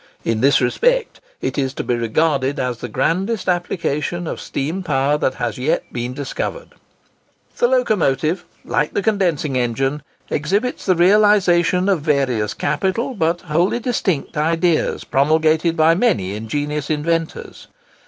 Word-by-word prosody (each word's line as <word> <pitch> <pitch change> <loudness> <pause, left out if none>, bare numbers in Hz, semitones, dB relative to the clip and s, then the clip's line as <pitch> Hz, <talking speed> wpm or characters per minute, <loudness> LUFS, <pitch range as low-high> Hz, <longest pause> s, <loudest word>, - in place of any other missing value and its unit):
In 115 -1 0
this 140 +1 +4
respect, - - +1 0.2
it - - -2
is 135 -1 -1
to - - -3
be - - -1
regarded 135 +4 0
as 125 -2 -2
the - - -5
grandest 185 - -1
application 175 -2 -1
of - - -5
steam 160 +8 -3
power 145 -4 +1
that 130 - 0
has - - -3
yet 135 +5 0
been 120 +1 -4
discovered. 315 - -4 0.9
The 485 +1 +3
Locomotive, 175 - +1 0.2
like 150 +4 -1
the 200 - 0
condensing 175 -10 0
engine, 135 +4 -1 0.3
exhibits 200 - -1
the 185 - +4
realisation 185 -1 +4
of 190 -6 +2
various 130 -8 0
capital, 190 - -1
but 170 -4 0
wholly 175 +5 +1
distinct, 205 - -1
ideas, 165 +2 +1
promulgated 155 +4 +2
by 160 +1 +5
many 110 - +1
ingenious 145 +7 -3
inventors. 165 +2 -2
155 Hz, 135 wpm, -19 LUFS, 135-185 Hz, 0.9 s, by